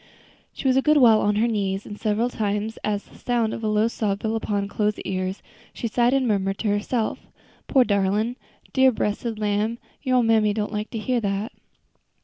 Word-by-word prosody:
She - - -4
was 260 0 +4
a - - +5
good 305 +2 +4
while 230 -5 +6
on 205 0 +2
her 220 +3 +2
knees, 200 -3 -1
and 205 - -7
several 215 +3 0
times, 210 0 -2
as 205 -1 -1
the - - -18
sound 235 -3 0
of 225 - -6
a - - 0
low 215 +1 +2
sob 210 -3 -2
fell 220 0 0
upon 205 -2 -1
Chloe's 210 +1 -1
ear, 185 -1 -2 0.4
she 235 - -3
sighed 240 +3 +2
and 265 -2 +1
murmured 195 -2 0
to 215 - -1
herself: 215 +3 -1 0.5
"Poor, 265 - +5
darlin'! 205 +2 +1 0.4
dear, 265 -1 +5
bressed 220 0 -2
lamb, 210 +2 0 0.2
your 255 -1 +1
ole 245 - +4
mammy 220 -2 +3
don't 210 0 -2
like 210 +1 -3
to 230 - -5
hear 240 +2 0
dat." 200 +2 -2
215 Hz, 200 wpm, -24 LUFS, 205-235 Hz, 0.5 s, while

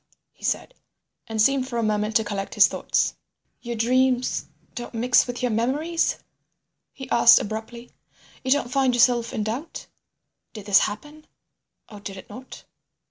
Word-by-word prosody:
he - - -23
said, - - -2 0.5
and 220 -1 -5
seemed 260 +3 +3
for 240 - -4
a 230 - 0
moment 215 0 -1
to 220 - +4
collect 200 -2 -5
his - - +7
thoughts. - - -1 0.5
"Your 240 -1 -5
dreams 255 +2 +1 0.3
don't 240 -1 -7
mix 250 +3 +3
with 245 +1 -5
your 250 - +1
memories?" 285 +10 0 0.7
he 265 -1 -10
asked 235 0 +7
abruptly. 225 +3 -7 0.5
"You 260 - -3
don't 260 -2 +1
find 265 -2 +2
yourself 240 -1 +3
in 215 - -2
doubt; 250 +10 -5 0.7
did 215 -3 -9
this 205 -1 +5
happen 295 +9 -11 0.6
or 210 - -12
did 200 -1 -8
it - - -12
not?" 255 +1 -11
240 Hz, 155 wpm, -24 LUFS, 220-260 Hz, 0.7 s, his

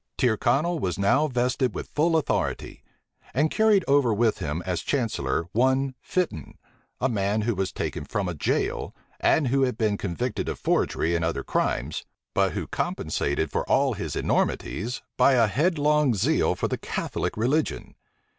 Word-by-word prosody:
Tyrconnel 140 +7 +2
was 90 -8 -2
now 100 +10 +3
vested 125 -1 0
with - - -6
full 160 +2 +3
authority; 155 - -2 0.5
and 150 +4 +2
carried 215 -4 +3
over 140 -4 +4
with 110 +1 +1
him 75 +4 -3
as 90 -2 -1
chancellor 115 -10 -1
one 130 +4 +2
Fitton, 170 - -3 0.4
a 130 - +2
man 105 -2 0
who 115 +2 0
was 95 -1 -2
taken - - -4
from 100 -2 -2
a 90 - -2
jail, 75 - -1 0.2
and 145 -5 +3
who 135 +2 +2
had 125 -4 +1
been 110 -3 +1
convicted 105 +5 -2
of - - -4
forgery 85 +2 0
and 85 - 0
other 80 0 -1
crimes, 65 +6 -1 0.3
but - - +2
who - - -3
compensated 70 +2 -2
for - - 0
all - - +3
his - - -4
enormities 115 +8 -1
by 140 - +5
a 120 -3 +5
headlong 150 - +2
zeal 95 - +2
for - - -1
the - - -3
Catholic - - -3
religion. 135 +8 0
120 Hz, 160 wpm, -25 LUFS, 100-145 Hz, 0.5 s, by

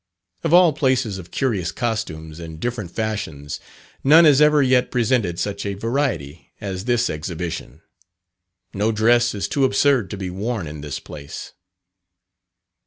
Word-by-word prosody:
Of - - 0
all 175 -2 +7
places 130 -8 0
of 85 -2 -11
curious 105 - -1
costumes 85 -9 -4
and 80 -1 -8
different 120 -3 -3
fashions, 95 -9 -4 0.4
none 160 +5 +7
has 145 -2 +6
ever 150 -1 +5
yet 130 -1 +3
presented 115 -8 +1
such 100 +1 -3
a 100 -1 -3
variety 110 - -2
as 95 -1 -5
this 120 -1 +2
Exhibition. 80 -2 -5 0.9
No 105 +3 +1
dress 120 +2 +3
is 100 - -2
too 140 -2 0
absurd 130 -3 +3
to 100 - -5
be 95 -2 -4
worn 105 +1 -3
in 75 -1 -7
this 70 -3 -5
place. 70 -2 -9
105 Hz, 145 wpm, -22 LUFS, 85-125 Hz, 0.9 s, all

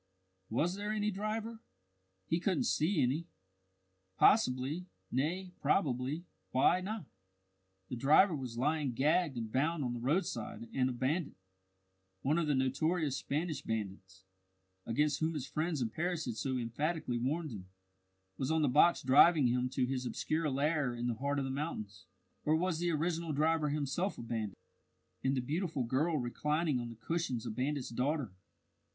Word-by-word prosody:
Was 155 +10 +1
there 205 +2 -3
any 210 0 0
driver? 215 +3 -3 0.7
He 165 - +1
couldn't 180 -3 +1
see 155 -1 +2
any. 145 +7 0 0.9
Possibly, 150 - +3 0.2
nay, 175 +8 -1
probably 140 0 +1 0.2
why 175 +8 +3
not? 210 -1 -4 0.8
the 125 - -4
driver 155 - +5
was 125 -4 -5
lying 145 0 +1
gagged 150 +2 +2
and 115 -2 -4
bound 150 +4 +1
on 120 -2 -1
the 120 - -4
roadside, 125 - -1
and 130 -1 +2
a - - -1
bandit, 140 +7 -1 0.9
one 150 +5 +2
of 165 - 0
the 145 - +2
notorious 140 +3 +1
Spanish 155 0 -2
bandits, 95 -3 -5 0.6
against 145 +5 +1
whom 160 +1 0
his 140 -4 -3
friends 155 -3 -1
in 110 - -2
Paris 170 +3 -1
had 120 - -2
so 130 +4 -1
emphatically 125 +2 -1
warned 150 +5 -1
him, 95 -4 -8 0.7
was 130 - -1
on 160 -1 +2
the - - +4
box 150 +6 +5
driving 145 +3 +6
him 125 +1 +1
to 130 0 0
his 125 -1 -2
obscure 155 +4 -1
lair 140 -2 +1
in 120 0 -3
the 120 - +1
heart 140 +5 -1
of 140 - 0
the 135 - -3
mountains. 110 - -5 0.4
Or 155 - +3
was 170 0 0
the 175 0 +1
original 165 0 -1
driver 155 +1 +2
himself 150 +6 -1
a - - -6
bandit, 110 -4 -3 0.7
and 135 +1 +1
the - - +1
beautiful 155 +1 -1
girl 150 +7 +1
reclining 150 +3 0
on 120 -1 -4
the 115 - -9
cushions 130 -1 -2
a - - -3
bandit's 130 +4 -2
daughter? 130 0 -1
145 Hz, 160 wpm, -33 LUFS, 125-165 Hz, 0.9 s, driving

